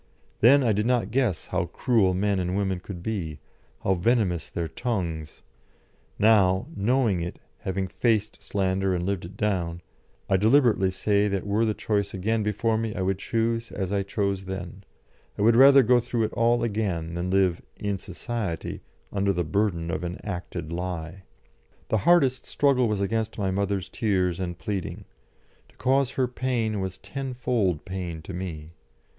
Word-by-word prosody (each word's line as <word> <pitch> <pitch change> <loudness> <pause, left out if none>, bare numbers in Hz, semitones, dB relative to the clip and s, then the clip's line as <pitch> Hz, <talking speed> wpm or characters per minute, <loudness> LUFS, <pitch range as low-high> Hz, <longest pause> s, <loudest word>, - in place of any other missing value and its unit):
Then 135 +5 +6
I 115 -3 +3
did 105 +2 0
not 120 -5 +1
guess 120 -9 +1
how 90 -1 -1
cruel 105 -7 +2
men 100 0 +1
and 90 +1 -1
women 95 -2 0
could 90 -1 -8
be, 90 -9 -3 0.5
how 95 - +3
venomous 95 -2 +1
their 85 -1 -3
tongues; 85 -9 -4 0.7
now, 100 -4 +4
knowing 110 -3 +2
it, 85 +1 -5 0.2
having 95 0 -2
faced 110 +1 0
slander 95 -1 0
and 90 0 -2
lived 95 -3 -2
it 95 +3 -11
down, 90 -5 -1 0.4
I 95 - +3
deliberately 110 -2 +4
say 100 +2 +1
that 100 -2 -2
were 105 +3 +2
the 110 -1 0
choice 100 -3 -1
again 110 +4 0
before 110 +2 0
me 115 -1 -3
I 95 - -1
would 95 0 0
choose 115 +1 -1
as 95 0 -3
I 100 - +2
chose 100 0 -2
then; 95 0 -6 0.5
I 100 - 0
would 115 +1 +5
rather 135 +2 +8
go 125 +1 +5
through 120 -1 -1
it 110 - -2
all 120 0 +2
again 100 -7 -1
than 85 +1 -2
live 95 -2 +2
"in 100 -2 -2
Society" 95 -1 -4 0.3
under 100 0 +2
the 90 -2 0
burden 85 -1 0
of 80 - -3
an 90 +1 -4
acted 90 -5 -5
lie. 90 +1 -5 0.6
The 110 - +2
hardest 135 -7 +4
struggle 135 -4 +2
was 105 -2 -1
against 110 +2 -1
my 95 -3 0
mother's 100 -1 -1
tears 95 -5 0
and 85 -2 -3
pleading; 100 -2 -4 0.6
to - - -25
cause 135 0 +1
her 130 -1 +1
pain 120 -4 -1
was 95 -1 -4
tenfold 125 - -2
pain 90 -4 -5
to 95 - -7
me. 85 -4 -6
100 Hz, 165 wpm, -26 LUFS, 90-115 Hz, 0.7 s, rather